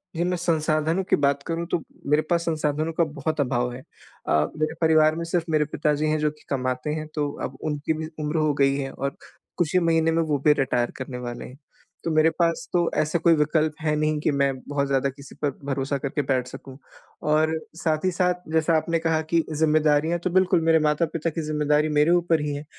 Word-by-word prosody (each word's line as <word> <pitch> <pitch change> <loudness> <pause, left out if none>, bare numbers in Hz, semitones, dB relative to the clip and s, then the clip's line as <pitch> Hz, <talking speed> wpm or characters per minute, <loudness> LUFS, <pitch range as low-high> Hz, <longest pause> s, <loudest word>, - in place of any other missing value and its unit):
जी, 170 - 0
मैं 180 0 0
संसाधन 160 0 +1
की - - +5
बात 140 0 +1
करूँ 165 +1 -3
तो - - +1 0.3
मेरे 150 +2 +3
पास 170 -1 +2
संसाधनों 155 -1 -1
का 170 - +2
बहुत 155 0 -3
अभाव 125 -2 0
है। 125 - -7 0.5
अ, - - -1 0.3
मेरे 155 +1 -1
परिवार 155 -1 +4
में 170 - -3
सिर्फ़ 165 0 -1
मेरे 155 -1 +3
पिताजी 150 0 0
हैं 155 - +1
जो 150 0 +2
कि 150 - -21
कमाते 130 +1 -2
हैं, 155 0 -4
तो 145 -2 -1
अब 130 - -5
उनकी 150 +1 -1
भी 155 0 -5 0.2
उम्र 150 +2 -1
हो 155 -1 +2
गई 135 0 +4
है 135 -1 -3
और 140 +1 -4 0.4
कुछ 175 0 0
ही 185 - +5
महीने 165 -1 +2
में 165 - +2
वो 150 -2 0
भी 150 - +7
रिटायर 125 -3 +1
करने 130 -1 -6
वाले 120 -1 -6
हैं। 130 - -12 0.5
तो 165 - -1
मेरे 155 +1 +4
पास 165 0 0
तो 175 -1 +2
ऐसा 155 +3 0
कोई 170 0 +4
विकल्प 155 0 +1
है 155 -1 +1
नहीं 155 0 0
कि 155 - +1
मैं 140 -1 +1
बहुत 140 -1 -1
ज़्यादा 135 0 +1
किसी 140 +1 -12
पर 145 -1 +1
भरोसा 140 0 -1
करके 140 +2 -2
बैठ 130 -2 -1
सकूँ। 130 +1 -10 0.6
और 155 +1 +2 0.3
साथ 155 +1 0
ही 185 - +2
साथ 180 -1 -1
जैसा 160 +1 +2
आपने 165 +1 0
कहा 160 -1 +1
कि 165 +1 +1
ज़िम्मेदारियाँ, 155 +1 +2
तो 180 +2 -2
बिल्कुल 185 -1 +3
मेरे 160 -1 +5
माता-पिता 155 +2 0
की 165 - -4
ज़िम्मेदारी 150 0 +2
मेरे 155 +3 +4
ऊपर 170 -2 +2
ही 150 -1 -2
है 145 - -6
155 Hz, 220 wpm, -24 LUFS, 145-165 Hz, 0.6 s, भी